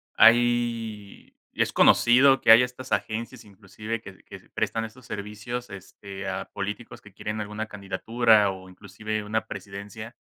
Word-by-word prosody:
hay 115 -3 +2 0.2
es - - 0
conocido, 135 +3 +5
que 110 - +6
hay 115 +2 +9
estas 125 +1 -7
agencias, 110 0 -3
inclusive, 105 +3 -7
que 95 -3 -12
que - - -11
prestan 115 0 -1
estos 115 +3 -13
servicios, 110 +4 -6
este, 100 0 -9
a 95 -1 -5
políticos 105 +3 -6
que 100 -2 -17
quieren 105 +2 -5
alguna 105 +1 -5
candidatura, 105 +1 +2
o 95 0 -11
inclusive, 105 +3 -6
una 110 +1 -2
presidencia. 100 +4 -9
110 Hz, 140 wpm, -25 LUFS, 100-115 Hz, 0.2 s, hay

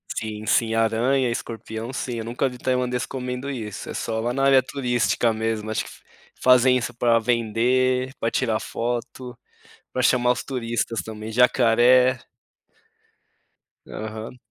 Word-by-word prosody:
Sim, 110 -1 -5
sim. 115 -1 +2
Aranha, 120 +3 +2
escorpião, 115 0 -5
sim. 125 -2 -4
Eu 110 - -5
nunca 120 +3 -1
vi 125 - -10
Tailandês 125 -1 -1
comendo 125 +1 -5
isso. 110 -7 -6
É - - -5
só 110 -1 -3
lá 120 +2 -1
na 135 +1 -1
área 135 -2 +5
turística 125 -3 0
mesmo. 110 -1 -2
Acho 110 - -1
que - - -10
f - - -16 0.4
fazem 125 0 +5
isso 125 0 -3
pra 115 -1 +3
vender, 125 +3 +1
pra 115 - 0
tirar 115 -4 0
foto, 120 +1 -4 0.5
pra 130 - -1
chamar 125 0 +3
os 125 - -2
turistas 120 -3 -2
também. 110 0 -7
Jacaré. 125 +1 +4 1.7
Aham. 110 +3 -7
120 Hz, 145 wpm, -23 LUFS, 115-125 Hz, 1.7 s, área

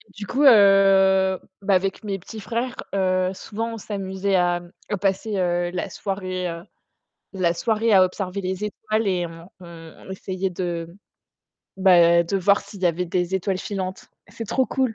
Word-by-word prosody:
Du 205 - -6
coup, 265 +9 0
heu, 195 -4 +5 0.2
bah 195 0 +1
avec 195 +3 0
mes 200 -2 -3
petits 205 +4 -10
frères, 240 +4 -3 0.2
heu, 185 -1 +1
souvent 225 +4 -5
on 225 - -6
s'amusait 195 -1 -2
à, 175 -1 +2
mmh, 175 0 -16 0.2
à 205 - -1
passer, 195 +3 -1
heu, 175 -1 0
la 180 +2 -3
soirée, 185 -1 -4
heu, 170 0 -7 0.7
la 180 -3 +1
soirée 220 +4 0
à 190 - +7
observer 185 +1 -4
les 190 +2 -3
étoiles 215 +1 -2
et 180 -2 0
on 165 +1 -12
on 165 -2 -12
on - - -10
essayait 190 0 -3
de, 170 -2 -4 0.8
bah 170 -3 +5
de 170 +4 -2
voir 200 +2 +3
s'il 200 - -12
y 180 - +3
avait 175 +1 0
des 180 +1 -1
étoiles 190 0 -1
filantes. 190 -2 -5 0.2
C'est 230 - -7
trop 260 +4 +1
cool. 255 -3 -1
190 Hz, 175 wpm, -23 LUFS, 180-205 Hz, 0.8 s, à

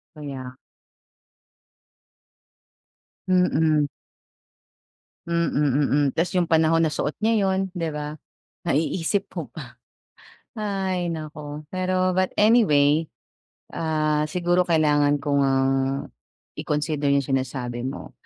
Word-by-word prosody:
Kaya 135 -4 -7 2.7
Mhm. 160 -5 +3 1.4
Hmm, 170 0 0
mm, 145 -1 +2
mm. 145 0 +3
Tapos 170 +2 0
yung 180 -3 +1
panahon 160 0 +3
na 160 - +3
suot 150 0 -2
niya 220 -1 +2
'yon, 190 0 +1 0.2
di 165 -3 -2
ba? 150 0 -5 0.5
Naiisip 165 +6 0
mo - - -5
pa. - - -10 0.8
Ay 195 -5 -2
naku! 150 -2 -6
Pero 185 0 +1
but 185 0 +1
anyway, 160 -9 +4 0.6
ah, 155 -2 0
siguro 175 +2 +1
kailangan 150 -3 +3
ko 145 -1 +1
ngang 135 -1 +2 0.9
i-consider 150 -1 -1
yung 140 0 +3
sinasabi 130 -2 -2
mo. 135 - -7
155 Hz, 100 wpm, -24 LUFS, 145-180 Hz, 2.7 s, anyway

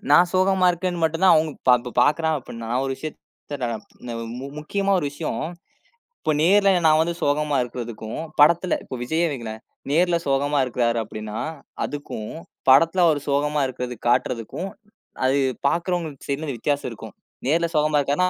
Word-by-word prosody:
நான் 175 +4 +7
சோகமா 185 0 +3
இருக்கேன்னு 175 0 -2
மட்டும் 160 +2 0
தான் 185 - +8
அவுங்க 155 0 +2
இப்ப 125 - +5
ப 125 - -5
பாக்குறா 160 +4 +2
அப்டின்னா. 115 -2 -8
நான் 130 +2 +1
ஒரு 135 - -1
விஷயத்த 155 -1 -7 1.4
முக்கியமா 195 +6 -1
ஒரு 150 - -2
விஷயம். 150 +2 -4 0.8
இப்போ 155 - 0
நேர்ல 195 +4 +5 0.2
நான் 155 0 +5
வந்து 170 +1 0
சோகமா 145 0 +1
இருக்குறதுக்கும் 120 -3 -6 0.2
படத்துல, 170 +4 +5
இப்போ 130 - -7
விஜய்யே 165 +6 +1
வைங்களேன். 110 -4 -6 0.3
நேர்ல 170 +2 +3
சோகமா 140 +1 +1
இருக்குறாரு 120 -1 0
அப்படின்னா, 110 0 -7 0.5
அதுக்கும் 145 -7 -6 0.4
படத்துல 165 +7 +5
அவரு 150 -3 +2
சோகமா 150 +1 +1
இருக்குறதுக்கு 125 -2 -6
காட்டுறதுக்கும் 125 - -1 0.6
அது 135 +2 +3 0.3
பாக்குறவங்க 170 0 0 0.3
என்னது 140 -4 -5
வித்தியாசம் 145 +2 -1
இருக்கும். 115 - -10 0.3
நேர்ல 170 +4 +2
சோகமா 150 0 +3
இருக்கார்னா. 150 +7 +1
150 Hz, 145 wpm, -23 LUFS, 125-170 Hz, 1.4 s, தான்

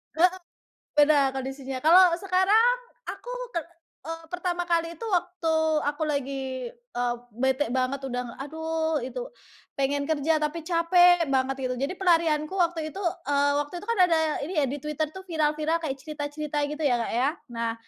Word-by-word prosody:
Heeh. 360 +3 +4 0.6
Beda, 290 -2 +4
kondisinya. 265 0 -5
Kalau 350 +4 +7
sekarang, 400 +6 +4 0.3
aku - - -6 0.2
ke - - +2 0.4
eee, 330 +1 -6
pertama 355 0 -2
kali 335 -1 +1
itu, 455 - -6
waktu 355 -3 0 0.3
aku 290 +2 -3
lagi, 270 -3 -3
eee, 245 0 -3 0.2
bete 265 +3 0
banget 260 +2 -1
udah, 250 -2 -4
aduh 320 +2 -2
itu, - - -5 0.5
pengen 280 +1 +1
kerja 315 +1 +2
tapi 300 +3 -1
capek 350 -1 +4
banget, 265 0 +1 0.2
gitu. 255 - -1
Jadi 275 +7 -1
pelarianku 330 -5 +2
waktu 335 -3 0
itu, - - -8 0.3
eee, 285 0 +3
waktu 295 +4 -12
itu 410 - -12
kan 465 - 0
ada 335 -2 +3 0.3
ini 340 - -6
ya 280 - +2
di 275 - -3
Twitter 300 +1 -1
tuh 380 - -8
viral-viral 310 -1 0
kayak 290 -5 -3
cerita-cerita 300 0 -4
gitu 300 +2 -5
ya, 250 -4 +3
Kak, 230 - -3
ya. 255 +3 +3 0.3
Nah, 230 0 -1
305 Hz, 160 wpm, -26 LUFS, 270-340 Hz, 0.6 s, Kalau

